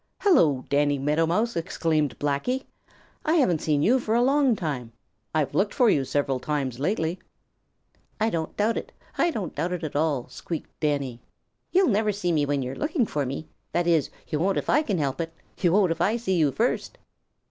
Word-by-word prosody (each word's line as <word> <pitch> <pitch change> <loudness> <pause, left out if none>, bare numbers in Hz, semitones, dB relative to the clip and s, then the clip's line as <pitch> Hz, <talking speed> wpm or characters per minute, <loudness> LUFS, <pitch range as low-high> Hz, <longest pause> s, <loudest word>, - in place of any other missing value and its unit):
"Hello, 160 - +4
Danny 145 0 +2
Meadow 150 +4 +1
Mouse!" 220 +8 0
exclaimed 160 -4 0
Blacky. 145 - -1 0.6
"I 315 - +1
haven't 245 - +3
seen 150 -2 +1
you 250 +8 +4
for 220 -2 -1
a 240 - +4
long 270 -2 +3
time. 135 - -4 0.4
I've 155 -3 +1
looked 205 +1 +1
for 245 -5 +5
you 140 - +2
several 140 -1 0
times 135 -3 -2
lately." 165 +2 -1 1.0
"I 220 +1 +2
don't 160 -1 -3
doubt 215 +2 +1
it. - - -5 0.3
I 345 - +4
don't 210 - -4
doubt 180 +2 -2
it 175 -2 -4
at 155 - -4
all," 145 -4 0
squeaked 165 -3 -6
Danny. 140 -6 -1 0.5
"You'll 370 -1 +4
never 215 0 +2
see 185 -3 -1
me 150 -3 +1
when 140 -1 0
you 125 - -4
are - - -7
looking 300 -4 0
for 145 -8 -2
me. 140 +4 -4 0.3
That 175 0 +1
is, 165 -4 +2 0.2
you 150 - -2
won't 190 +3 +1
if - - 0
I 300 - +4
can 210 -11 -1
help 140 0 -1
it. 165 0 -4 0.3
You 175 - +3
won't 195 -3 +4
if 165 - -2
I 220 +4 +2
see 205 -5 -1
you 155 -5 +3
first." - - -1
165 Hz, 200 wpm, -26 LUFS, 145-215 Hz, 1.0 s, for